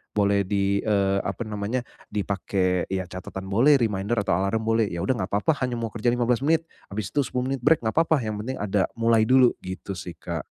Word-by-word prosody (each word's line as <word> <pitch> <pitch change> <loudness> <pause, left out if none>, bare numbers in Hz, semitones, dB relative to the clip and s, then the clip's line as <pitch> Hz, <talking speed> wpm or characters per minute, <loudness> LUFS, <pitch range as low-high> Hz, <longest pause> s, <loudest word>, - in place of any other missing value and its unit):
Boleh 100 -1 +3
di, 100 0 0
eee, 100 -2 +2
apa 120 - -3
namanya, 105 +4 -2 0.3
dipakai 95 -2 0
ya 95 -1 -2
catatan 95 +1 -7
boleh, 120 +10 +5
reminder 105 0 0
atau 95 - +1
alarm 100 +4 0
boleh. 115 -1 +2
Ya, 85 - -4
udah 130 - +1
nggak 95 - -2
apa-apa, 105 +11 +2
hanya 125 -1 -1
mau 115 - -2
kerja 120 +2 0
15 120 +1 +1
menit, 160 +2 +2 0.2
abis 100 -1 -4
itu 145 - +3
10 125 0 -2
menit 135 -2 -2
break, 155 +3 +5
nggak 110 - -1
apa-apa. 160 -2 +3
Yang 110 -1 -3
penting 130 +2 -4
ada, 100 -1 +1
mulai 115 -1 +3
dulu, 130 -1 +5
gitu 95 +1 -6
sih, 90 -1 -7
Kak. - - -4
105 Hz, 210 wpm, -25 LUFS, 95-125 Hz, 0.3 s, boleh